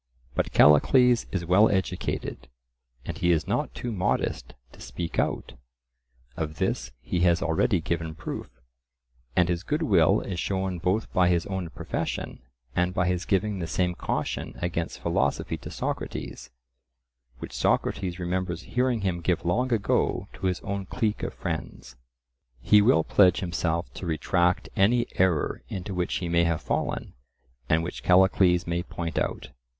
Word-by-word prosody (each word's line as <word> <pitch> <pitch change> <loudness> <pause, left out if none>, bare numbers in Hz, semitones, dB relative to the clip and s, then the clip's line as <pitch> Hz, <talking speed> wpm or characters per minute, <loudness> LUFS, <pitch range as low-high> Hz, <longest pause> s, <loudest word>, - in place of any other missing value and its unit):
But - - -1
Callicles 120 - +5
is 90 -3 -2
well 90 +6 +5
educated; 95 -8 -2 0.6
and - - -5
he 85 0 +3
is 80 -2 +2
not - - -1
too 120 - -4
modest 95 -4 -1 0.2
to - - -16
speak 80 +7 -4
out - - -1 0.8
(of 75 -1 -4
this - - -1
he 90 - -1
has 85 0 +3
already 85 +4 +2
given 80 -1 -3
proof), - - -6 0.9
and 90 -1 +4
his 85 -1 -1
good 150 - -1
will 90 - +4
is 90 -3 -4
shown 95 -1 -2
both 95 +6 -1
by 90 -1 +4
his 85 -2 +1
own 95 -3 -4
profession - - -4 0.3
and 90 +1 +1
by 90 - +2
his 90 -1 -1
giving 100 0 0
the 85 - -3
same 90 +1 0
caution - - -3
against 85 -1 -2
philosophy - - 0
to - - -9
Socrates, 65 - -5 0.9
which - - -8
Socrates 90 -2 0
remembers 90 -1 -2
hearing 125 -2 +1
him 90 -3 -1
give 85 -1 0
long 125 +9 +1
ago 110 -4 +1
to 95 - -3
his 90 0 -1
own 100 -1 -4
clique 110 -4 -1
of - - -3
friends. - - -5 0.6
He 105 - +5
will 80 -5 +4
pledge 90 0 +4
himself 85 -1 -2
to 90 - -6
retract 85 +3 +1
any 115 +5 +3
error 90 -5 +1
into 95 +1 -5
which 90 -1 -1
he 90 - -2
may 85 0 +3
have 85 -2 -1
fallen, - - -2 0.6
and 80 +1 +3
which 85 - -5
Callicles 90 -1 +4
may 85 0 -1
point 85 -1 -4
out. - - -3
90 Hz, 155 wpm, -26 LUFS, 85-95 Hz, 0.9 s, Callicles